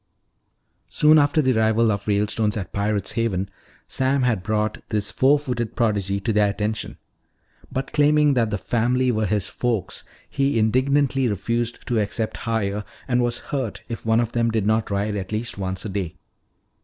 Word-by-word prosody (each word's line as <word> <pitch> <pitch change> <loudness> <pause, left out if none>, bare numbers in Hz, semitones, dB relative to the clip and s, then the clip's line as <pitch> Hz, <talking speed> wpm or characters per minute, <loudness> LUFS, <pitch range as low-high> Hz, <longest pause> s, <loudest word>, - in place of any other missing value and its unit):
Soon 155 +1 +5
after 145 +1 +3
the 130 -2 +2
arrival 110 0 +3
of 100 -1 -3
the 105 - +2
Ralestones 105 0 0
at 100 - -6
Pirate's 100 0 -1
Haven, 105 -4 -1 0.4
Sam 130 0 +1
had 115 -7 +1
brought 105 +2 -1
this 105 -2 -1
four 140 +3 +4
footed 125 -5 -3
prodigy 100 -4 0
to 110 +3 -1
their 105 -1 +3
attention. 105 +2 -3 0.7
But 135 +1 -4
claiming 150 0 +4
that 115 -4 +2
the 105 - -1
family 125 +4 +1
were 110 -2 0
his 100 -1 0
"folks," 115 -6 -2 0.2
he 135 -3 0
indignantly 130 +4 +2
refused 115 +3 -2
to 120 -2 0
accept 110 +2 -2
hire 105 -3 -2 0.2
and 125 -1 +2
was 120 0 0 0.2
hurt 130 -7 -2
if 115 - -5
one 115 0 +3
of 120 -1 0
them 115 -1 +1
did 110 -3 0
not 110 +1 +1
ride 100 +1 -1
at 95 -1 -5
least 110 -1 -3
once 95 0 -3
a - - -3
day. 95 -4 -3
110 Hz, 175 wpm, -23 LUFS, 105-125 Hz, 0.7 s, Soon